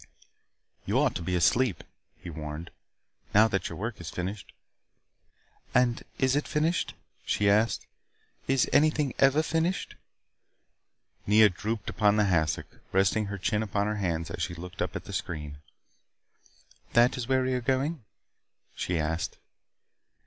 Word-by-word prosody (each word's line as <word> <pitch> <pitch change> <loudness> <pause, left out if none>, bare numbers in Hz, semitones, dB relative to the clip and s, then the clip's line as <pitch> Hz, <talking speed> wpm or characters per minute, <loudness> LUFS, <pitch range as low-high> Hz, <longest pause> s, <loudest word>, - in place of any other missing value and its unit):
"You - - 0
ought - - +3
to - - -4
be 90 +2 -1
asleep," 90 +3 +2 0.3
he 85 - -9
warned. 75 +2 -6 0.6
"Now 110 +2 +7
that 95 -2 -1
your 85 - -7
work 110 0 -4
is 85 - -6
finished 95 +4 -5 0.6
" - - -31
"And 125 -1 +3 0.2
is 130 0 +2
it 145 - 0
finished?" 160 +4 0 0.3
she 105 - +1
asked. 105 +3 +3 0.6
"Is 135 -2 +3
anything 150 -2 +3
ever 140 +3 +5
finished?" 165 +3 -1 1.3
Nea 105 +1 +7
drooped 105 +3 -4
upon 105 -1 +3
the 105 -1 +3
hassock. 80 -5 0
Resting 95 +3 +2
her 100 0 -4
chin 105 +3 0
upon 100 -1 -1
her 105 0 -1
hands 85 -4 -2
she 85 +1 -2
looked 90 +2 -8
up - - -2
at - - -4
the - - -9
screen. 75 -3 -4 1.3
"That 120 +1 +5
is 125 -2 -4
where 130 -1 +2
we 130 0 0
are 125 - 0
going?" 135 +3 0 0.7
she 90 - -2
asked. 80 +2 -2
105 Hz, 145 wpm, -28 LUFS, 90-130 Hz, 1.3 s, Now